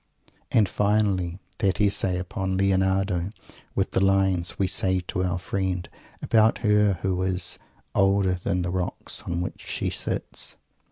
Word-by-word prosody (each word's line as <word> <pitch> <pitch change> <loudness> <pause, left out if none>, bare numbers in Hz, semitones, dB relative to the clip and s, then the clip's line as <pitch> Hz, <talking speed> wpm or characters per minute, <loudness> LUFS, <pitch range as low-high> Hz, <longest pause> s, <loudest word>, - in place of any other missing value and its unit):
And, 105 -3 +4
finally, 100 -4 +1 0.2
that 95 -1 +1
Essay 100 -3 +2
upon 95 +1 -2
Leonardo, 95 -1 +1 0.5
with - - 0
the - - +1
lines 95 -2 +2
"we 100 - +2
say 95 0 +2
to 90 +1 -3
our 90 -1 0
friend" 90 -1 -2 0.4
about 110 0 +4
Her 105 -1 +4
who 95 -1 0
is 90 -1 -1 0.3
"older 95 -1 +3
than 90 0 -1
the 90 - -2
rocks 90 -1 -1
on 85 0 -3
which 90 - -5
she - - -2
sits." - - -3
95 Hz, 145 wpm, -25 LUFS, 90-100 Hz, 0.5 s, And